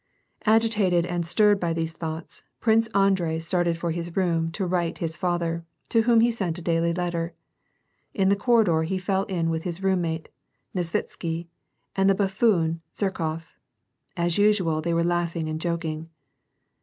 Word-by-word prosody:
Agitated 215 -6 +3
and 175 -1 -2
stirred 205 +3 +4
by 170 -2 0
these 165 0 -2
thoughts, 160 0 -6 0.2
Prince 225 0 +3
Andrei 195 -6 +2
started 170 0 0
for 170 0 -2
his 170 0 -5
room 165 -3 +1
to 190 +2 -2
write 175 -2 -1
his 165 -1 -3
father, 170 -2 -1 0.3
to 225 - +4
whom 230 0 +4
he 235 +1 +4
sent 190 -7 -2
a - - -7
daily 165 0 +1
letter. 170 -1 -2 0.8
In 190 -1 +1
the 200 - +4
corridor 200 -6 +3
he 170 +4 -1
fell 190 +1 0
in 170 -4 -1
with 160 0 -1
his 175 +2 -5
roommate, 170 -4 0 0.4
Nesvitsky, 170 -1 -3 0.5
and 195 0 +3
the 195 - +4
buffoon 190 -5 +1
Zherkof; 165 -5 -3 0.6
as 170 +1 +1
usual, 190 -7 +3
they 170 +1 0
were 170 - +2
laughing 170 -1 -1
and 155 0 -3
joking. 165 -2 -3
175 Hz, 155 wpm, -25 LUFS, 165-195 Hz, 0.8 s, stirred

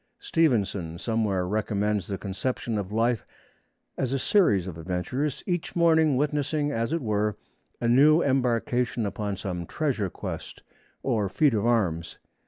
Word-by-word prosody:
Stevenson 100 - 0
somewhere 100 -3 0
recommends 105 -1 0
the 100 - -3
conception 110 +3 -3
of 100 -1 -5
life 115 +1 +1 0.8
as 130 -1 0
a - - +2
series 135 - +3
of 90 -4 -6
adventures, 95 - -2
each 175 -3 -2
morning 160 -4 +4
witnessing 145 +1 0
as 115 0 -1
it 165 -3 -1
were 105 -1 0 0.4
a 120 - 0
new 150 +7 +6
embarkation 125 -3 +1
upon 100 -1 -3
some 90 -4 -4
treasure 130 -11 -1
quest - - -7 0.4
or 110 -7 0
feat 130 +8 +3
of 110 +1 +1
arms. 90 -9 0
115 Hz, 140 wpm, -26 LUFS, 100-140 Hz, 0.8 s, new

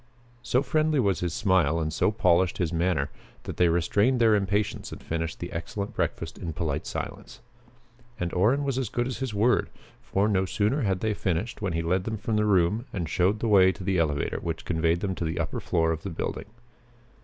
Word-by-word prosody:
So 125 +3 +1
friendly 155 +2 +1
was 100 -6 +2
his 90 -1 -1
smile 90 -5 +2
and 80 -1 -2
so - - +2
polished 90 -4 +2
his 90 -4 -1
manner 80 -4 0 0.3
that - - -6
they 90 -1 +4
restrained 100 +9 +2
their 115 -2 +5
impatience 100 0 0
and - - -7
finished 80 0 -3
the 85 - -5
excellent 100 +5 -4
breakfast - - -3
in 80 - -4
polite 80 -3 -2
silence. - - -6 0.8
And 90 -1 -2
Orrin 115 +11 +3
was 135 -2 -1
as 125 -6 -2
good 120 +2 -1
as 130 -1 -4
his 130 -5 -3
word, 115 +5 +2 0.3
for, 100 +2 0
no 95 -3 +2
sooner 105 +9 0
had 95 -5 0
they 110 -1 +1
finished 100 +4 -2
when 95 -4 -1
he 85 0 -1
led 90 +3 0
them 110 -1 -2
from 110 +1 -2
the 105 0 +2
room 105 +4 +2
and 85 -4 -3
showed 95 +7 +1
the 115 - 0
way 95 -3 +6
to 95 - -9
the 95 -1 +1
elevator 75 -3 0
which 80 -1 -4
conveyed 85 0 +1
them 95 -2 -1
to 90 - -4
the 80 0 -2
upper - - -2
floor 80 0 +1
of 80 -1 -3
the 100 - -5
building. 80 - -4
95 Hz, 210 wpm, -27 LUFS, 85-110 Hz, 0.8 s, way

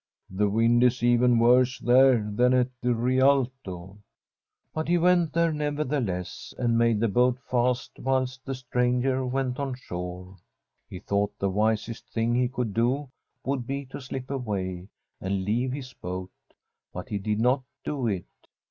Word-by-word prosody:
' - - -52
The 100 +2 +1
wind 115 +3 +3
is 125 -1 +2
even 120 0 +4
worse 125 +2 +4
there 125 -3 +4
than 125 +5 +3
at 125 0 +2
the 125 0 +1
Rialto/ 125 -7 0 0.7
But 155 0 -3
he 175 +1 +3
went 175 -2 +3
there, 170 0 +2
nevertheless, 145 - -3
and 120 -2 +1
made 115 -2 +3
tbe 110 -3 0
boat 125 0 +3
fast 125 -1 -1
whilst 130 0 -1
the 135 0 -4
stranger 125 +1 0
went 130 0 -2
on 135 -2 -2
shore. 90 -4 -7 0.5
He - - -7
thought 100 +2 -1
the 100 -1 -1
wisest 110 +3 -1
thing 115 +1 0
he 125 +1 +2
could 120 -4 -3
do 125 +5 0 0.3
would 130 -3 -2
be 140 +1 -3
to - - -7
slip 130 0 -6
away 95 -8 -3 0.3
and 95 0 -2
leave 120 +5 0
his 135 -1 -6
boat, 90 +1 -6 0.6
but - - -7
he 105 - -2
did 105 +2 -1
not 125 +4 +3 0.2
do 135 -5 -2
it. 95 -5 -2
125 Hz, 160 wpm, -26 LUFS, 105-130 Hz, 0.7 s, even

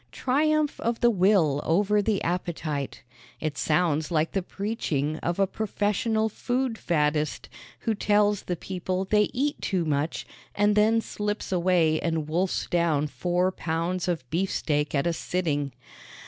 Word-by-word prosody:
Triumph 300 +3 +1
of 235 0 -1
the 240 - +5
will 180 -8 +3
over 205 +5 +2
the 205 -1 0
appetite. 165 -5 -3 0.4
It 155 -2 -2
sounds 155 -1 +1
like 160 -1 +1
the 195 - 0
preaching 170 -7 -2
of 170 +1 -2
a 195 - +4
professional 220 +2 0
food 245 +2 -1
faddist, 150 -2 0 0.3
who 225 - 0
tells 205 -1 +2
the 180 - -3
people 185 +1 -3
they 210 +1 +3
eat 290 +4 -1
too 185 -4 0
much 150 +1 -1 0.3
and 205 0 +3
then 220 +2 +4
slips 210 -1 -4
away 175 -3 +3
and 160 -3 -1
wolfs 175 +4 0
down 165 -4 +1
four 180 +4 0
pounds 175 +2 -2
of 160 -8 -2
beefsteak 155 -4 0
at 140 - +1
a 170 - +1
sitting. 155 -5 -1
180 Hz, 145 wpm, -26 LUFS, 160-210 Hz, 0.4 s, the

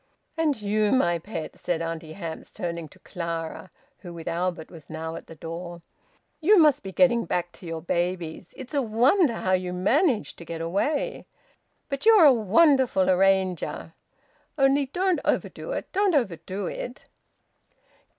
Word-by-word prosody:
"And 310 -6 0
you, 210 0 +1
my 175 -10 +2
pet," 165 -3 -7
said 175 -2 -1
Auntie 165 -1 -5
Hamps, 165 -3 -7
turning 170 -2 -5
to - - -19
Clara, 170 +1 -5 0.3
who 175 - -9
with 165 -1 -9
Albert 170 -1 -2
was 160 -4 -13
now 160 0 -5
at - - -9
the 165 - -11
door. 170 +1 -7 0.6
"You 395 +7 +5
must 305 -5 +5
be 195 - -7
getting 235 0 +3
back 175 +1 -2
to 175 - -12
your 165 -1 -5
babies! 175 -1 -2
It's 260 +2 -9
a 285 - +2
wonder 250 - +3
how 185 - -2
you 180 -1 0
manage 235 - +1
to - - -10
get 165 0 -6
away! 280 - -1 0.6
But 275 +8 -3
you're 430 -7 +8
a 280 - +8
wonderful 230 - +3
arranger!... 190 -1 +1 0.6
Only 275 0 +3
don't 365 +5 0
overdo - - -2
it. - - -5
Don't 390 -3 +2
overdo 190 - -2
it!" 245 +8 -6
190 Hz, 155 wpm, -25 LUFS, 170-270 Hz, 0.6 s, you're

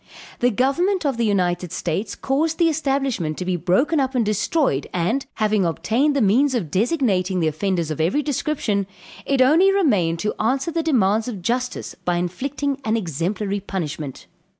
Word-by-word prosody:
The 245 - +3
government 320 - +1
of 275 -4 0
the 235 - +1
United 180 -3 0
States 180 +6 -3
caused 310 +4 0
the 335 -2 +4
establishment 270 - -1
to 180 - -4
be 185 0 0
broken 245 - +1
up 265 -1 -1
and 240 -3 +2
destroyed; 215 - 0
and, 200 +10 -1
having 215 -2 +1
obtained 220 - +1
the 275 - +2
means 255 +7 +3
of 175 -11 -2
designating 195 - +1
the 165 - +1
offenders 165 +1 -1
of 155 - -2
every 190 - +1
description, 260 -9 -1 0.4
it 270 -2 +4
only 330 +9 +5
remained 205 - +2
to 210 - -1
answer 265 +8 0
the 330 0 0
demands 225 -8 +2
of 205 -8 -6
justice 250 +5 -2
by 175 - -2
inflicting 270 +11 -2
an 225 -1 +1
exemplary 195 +3 -2
punishment. 155 -8 -5
220 Hz, 170 wpm, -22 LUFS, 180-275 Hz, 0.4 s, only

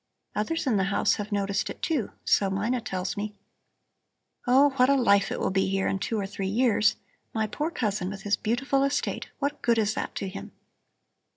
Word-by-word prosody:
Others 305 +12 -1
in 240 -6 +2
the 190 - +2
house 200 +1 +2
have 210 +1 -5
noticed 200 -1 0
it, - - -7
too, 295 - 0
so 195 - +3
Mina 215 +6 0
tells 185 -5 -3
me. 210 +1 -4 1.1
Oh, 275 +3 +6
what 255 +1 +5
a 280 - +5
life 200 -6 +3
it - - -2
will - - 0
be 190 0 +2
here 195 0 0
in 195 - 0
two 220 +3 -1
or 200 - -1
three 195 -1 -4
years. 215 0 +3 0.4
My 220 -1 +1
poor 300 +9 -2
cousin 210 - -1
with 195 -1 -7
his 205 0 +2
beautiful 270 +5 0
estate! 275 +1 -1
What 285 +1 -2
good 235 -1 +2
is 215 -1 +2
that - - -4
to 195 - -3
him?" 190 +1 -8
210 Hz, 200 wpm, -27 LUFS, 195-250 Hz, 1.1 s, Oh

